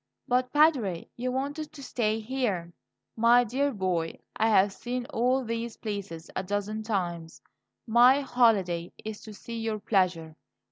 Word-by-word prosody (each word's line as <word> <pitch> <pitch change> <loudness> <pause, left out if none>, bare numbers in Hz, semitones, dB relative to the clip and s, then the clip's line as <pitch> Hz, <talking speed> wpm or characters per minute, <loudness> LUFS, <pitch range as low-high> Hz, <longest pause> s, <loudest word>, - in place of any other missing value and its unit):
"But, 250 0 +1
Padre, 270 - +3
you 250 +1 -2
wanted 285 +4 -3
to 285 -3 -10
stay 220 -4 -1
here?" 215 -8 -2 0.4
"My 235 +2 +5
dear 275 +5 0
boy, 185 -7 -2 0.2
I 225 - +2
have 200 -2 +4
seen 245 +3 -4
all 255 +3 +2
these 230 0 -4
places 200 -7 -5
a - - 0
dozen 205 +3 -3
times. 175 -6 -3 0.5
My 245 +4 +6
holiday 200 -10 +2
is 215 -1 -6
to 215 - -10
see 230 +2 -7
your 225 -1 -2
pleasure. 180 -6 0
220 Hz, 145 wpm, -28 LUFS, 190-250 Hz, 0.5 s, My